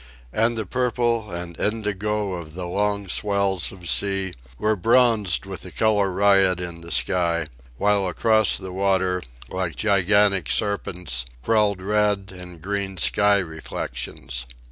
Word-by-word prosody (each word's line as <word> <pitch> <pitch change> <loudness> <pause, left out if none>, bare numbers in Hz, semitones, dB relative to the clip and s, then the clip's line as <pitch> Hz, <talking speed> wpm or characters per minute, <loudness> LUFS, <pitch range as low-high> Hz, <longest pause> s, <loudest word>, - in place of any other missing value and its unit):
And 115 +1 +1
the 110 - -2
purple 120 -1 0
and 85 -1 -6
indigo 105 -1 -1
of 85 -3 -7
the 90 -1 -4
long 100 +2 -1
swells 100 -1 0
of 90 -2 -10
sea 95 +7 +1 0.2
were 110 0 +1
bronzed 110 -3 +3
with - - -7
the - - -9
colour 105 -3 +2
riot 95 -1 +4
in 85 -1 -5
the 85 - -8
sky, 85 +1 +1 0.3
while 100 +1 +2
across 110 +3 +2
the 95 -1 -7
water, 95 -1 +1 0.3
like 95 -3 -2
gigantic 100 -3 +3
serpents, 90 - -1 0.2
crawled 105 -4 +2
red 105 -1 +1
and 90 -2 -11
green 100 -1 -3
sky 100 +5 +3
reflections. 65 -7 -5
95 Hz, 135 wpm, -23 LUFS, 90-105 Hz, 0.3 s, riot